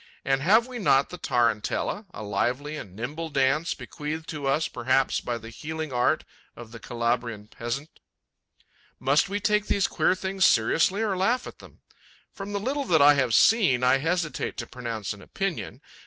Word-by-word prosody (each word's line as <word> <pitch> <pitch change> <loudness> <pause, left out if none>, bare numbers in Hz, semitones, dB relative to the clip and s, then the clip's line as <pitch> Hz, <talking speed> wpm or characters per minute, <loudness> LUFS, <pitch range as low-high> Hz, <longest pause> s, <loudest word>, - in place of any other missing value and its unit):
And 135 0 +1
have 215 +9 +5
we 250 -1 -7
not 140 -9 +3
the 180 - -8
tarantella, 120 - 0
a 110 - -8
lively 125 +9 -1
and 95 -11 -9
nimble 150 +9 -5
dance, 145 +4 +1
bequeathed 155 +1 -6
to 145 -3 -4
us 150 +4 +1
perhaps 130 +2 +1
by 120 -1 -3
the 115 0 -10
healing 155 +2 -5
art 125 0 +2 0.3
of 120 -2 -11
the 115 - -9
Calabrian 115 -3 -2
peasant? 120 +7 -6 1.0
Must 140 +7 +2
we 205 +1 -2
take 210 0 +1
these 195 - +2
queer - - +2
things 190 0 -2
seriously 165 - +3
or 205 -3 0
laugh 225 +7 +1
at - - -10
them? - - -16 0.5
From 195 +1 -7
the 200 - -1
little 275 +6 -2
that 165 -8 +3
I 145 +1 +8
have 130 -5 +1
seen, 185 - +4
I 125 +1 +5
hesitate 165 +1 -2
to - - -4
pronounce 115 -5 -5
an 100 - -13
opinion. 195 - -4
145 Hz, 175 wpm, -26 LUFS, 120-185 Hz, 1.0 s, I